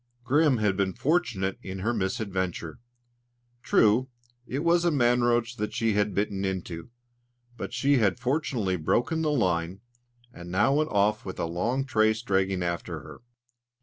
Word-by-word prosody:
Grim 145 Hz, +2 st, +3 dB
had 105 Hz, -3 st, +1 dB
been 95 Hz, -1 st, -1 dB
fortunate 120 Hz, -, 0 dB
in 95 Hz, -1 st, -6 dB
her 115 Hz, +5 st, 0 dB
misadventure. 95 Hz, -6 st, -3 dB, 0.8 s
True, 115 Hz, +5 st, +3 dB, 0.4 s
it 140 Hz, +4 st, -3 dB
was 170 Hz, 0 st, +3 dB
a 175 Hz, -, +3 dB
man 125 Hz, -5 st, +3 dB
roach 120 Hz, 0 st, +1 dB
that 105 Hz, 0 st, -3 dB
she 115 Hz, -1 st, +1 dB
had 105 Hz, 0 st, 0 dB
bitten 100 Hz, -1 st, -1 dB
into, 90 Hz, -2 st, -4 dB, 0.7 s
but 110 Hz, -, -6 dB
she 140 Hz, 0 st, +2 dB
had 105 Hz, -2 st, +2 dB
fortunately 125 Hz, -, -1 dB
broken 120 Hz, -, 0 dB
the 155 Hz, -, +1 dB
line, 90 Hz, -, 0 dB, 0.5 s
and 85 Hz, -4 st, -10 dB
now 110 Hz, +9 st, +2 dB
went 155 Hz, +2 st, +1 dB
off 105 Hz, +2 st, +1 dB
with 95 Hz, -, -7 dB
a -, -, 0 dB
long 115 Hz, +11 st, -1 dB
trace 110 Hz, -3 st, +2 dB
dragging 95 Hz, -4 st, 0 dB
after 85 Hz, -1 st, -3 dB
her. -, -, -12 dB
110 Hz, 155 wpm, -27 LUFS, 95-125 Hz, 0.8 s, Grim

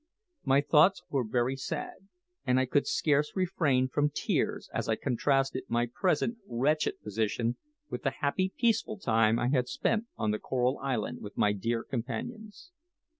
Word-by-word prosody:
My 135 Hz, +1 st, +4 dB
thoughts 155 Hz, +6 st, +4 dB
were 135 Hz, -3 st, +1 dB
very 120 Hz, +3 st, 0 dB
sad, 160 Hz, +7 st, -5 dB, 0.4 s
and 125 Hz, +1 st, +2 dB
I 130 Hz, -, +2 dB
could 140 Hz, +3 st, +1 dB
scarce 150 Hz, 0 st, +1 dB
refrain 160 Hz, -9 st, +1 dB
from 145 Hz, +3 st, +1 dB
tears -, -, -1 dB
as -, -, -2 dB
I 110 Hz, -, +3 dB
contrasted 135 Hz, +2 st, 0 dB
my 120 Hz, +1 st, +1 dB
present 200 Hz, +6 st, 0 dB
wretched 150 Hz, +5 st, 0 dB
position 110 Hz, +3 st, -1 dB, 0.3 s
with -, -, -5 dB
the 135 Hz, -, +1 dB
happy, 185 Hz, +8 st, -1 dB
peaceful 225 Hz, -2 st, +1 dB
time 115 Hz, -, +3 dB
I 120 Hz, +1 st, 0 dB
had 130 Hz, -3 st, +1 dB
spent 225 Hz, -, 0 dB
on 110 Hz, -, 0 dB
the 105 Hz, -, -2 dB
Coral 125 Hz, +1 st, 0 dB
Island 130 Hz, -6 st, -2 dB
with 105 Hz, -, -9 dB
my 105 Hz, -, +3 dB
dear 115 Hz, +3 st, -2 dB
companions. 210 Hz, -, -6 dB
135 Hz, 160 wpm, -30 LUFS, 120-155 Hz, 0.4 s, My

